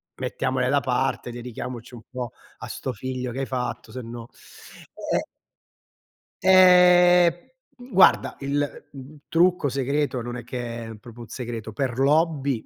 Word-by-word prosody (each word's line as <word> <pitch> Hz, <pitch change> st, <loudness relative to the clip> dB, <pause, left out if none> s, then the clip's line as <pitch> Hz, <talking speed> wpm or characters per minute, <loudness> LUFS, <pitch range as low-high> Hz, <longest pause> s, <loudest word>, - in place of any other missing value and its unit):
mettiamole 130 Hz, -1 st, -2 dB
da 140 Hz, +2 st, +2 dB
parte. 130 Hz, -1 st, -1 dB
Dedichiamoci 120 Hz, 0 st, -7 dB
un 120 Hz, -, -10 dB
po' 125 Hz, -2 st, -5 dB, 0.3 s
a -, -, -8 dB
'sto 130 Hz, -, -5 dB
figlio 125 Hz, +2 st, -5 dB
che 130 Hz, -, -5 dB
hai 135 Hz, -, -1 dB
fatto, 125 Hz, -4 st, -4 dB
sennò 120 Hz, -2 st, -7 dB, 0.9 s
"e -, -, +3 dB, 1.2 s
Ehm, 180 Hz, -2 st, +6 dB, 0.6 s
guarda, 190 Hz, -, +4 dB
il, 145 Hz, +1 st, -3 dB
mhmm, 140 Hz, +2 st, -12 dB
trucco 175 Hz, -2 st, +2 dB
segreto, 140 Hz, 0 st, -1 dB
non 120 Hz, +1 st, -6 dB
è 120 Hz, -, -8 dB
che 120 Hz, -1 st, -6 dB
è 115 Hz, -, -8 dB
proprio 120 Hz, +2 st, -13 dB
un 115 Hz, -, -9 dB
segreto, 115 Hz, -3 st, -6 dB
per 125 Hz, +1 st, -2 dB
l'hobby, 140 Hz, -3 st, +1 dB
130 Hz, 140 wpm, -24 LUFS, 120-145 Hz, 1.2 s, Ehm